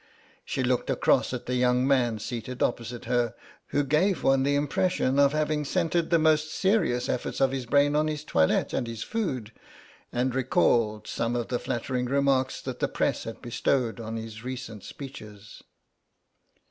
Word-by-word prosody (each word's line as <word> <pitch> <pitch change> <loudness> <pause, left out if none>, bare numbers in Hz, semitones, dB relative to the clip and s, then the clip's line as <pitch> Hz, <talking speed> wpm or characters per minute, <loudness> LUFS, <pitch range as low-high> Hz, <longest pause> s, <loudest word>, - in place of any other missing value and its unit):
She 130 - -2
looked 125 0 0
across - - +2
at 125 -1 -5
the 125 - -2
young 125 +1 +2
man 125 -5 +2
seated 120 +3 -4
opposite 120 0 -2
her, 120 -1 0 0.3
who 145 - +1
gave 155 +7 +1
one 135 0 +4
the 140 +1 +2
impression 145 -1 +1
of 140 -1 +5
having 155 0 0
centred 170 +2 0
the 170 - +4
most 155 -1 +2
serious 190 - +1
efforts 125 - -2
of 135 -1 +3
his 130 -3 -4
brain 145 +3 +3
on 155 +1 +2
his 150 -1 -3
toilet 80 - +1
and 120 - -1
his 115 -2 -5
food, 135 - -3 0.6
and 125 +1 0
recalled 115 -4 +2
some 115 +1 -2
of 120 -1 -2
the 120 - 0
flattering 125 0 -2
remarks 135 0 +1
that - - -5
the - - +1
press - - -1
had 115 +2 -8
bestowed 120 0 0
on 115 0 -5
his 110 0 -7
recent 125 -5 -6
speeches. 110 -7 -10
130 Hz, 170 wpm, -27 LUFS, 120-145 Hz, 0.6 s, of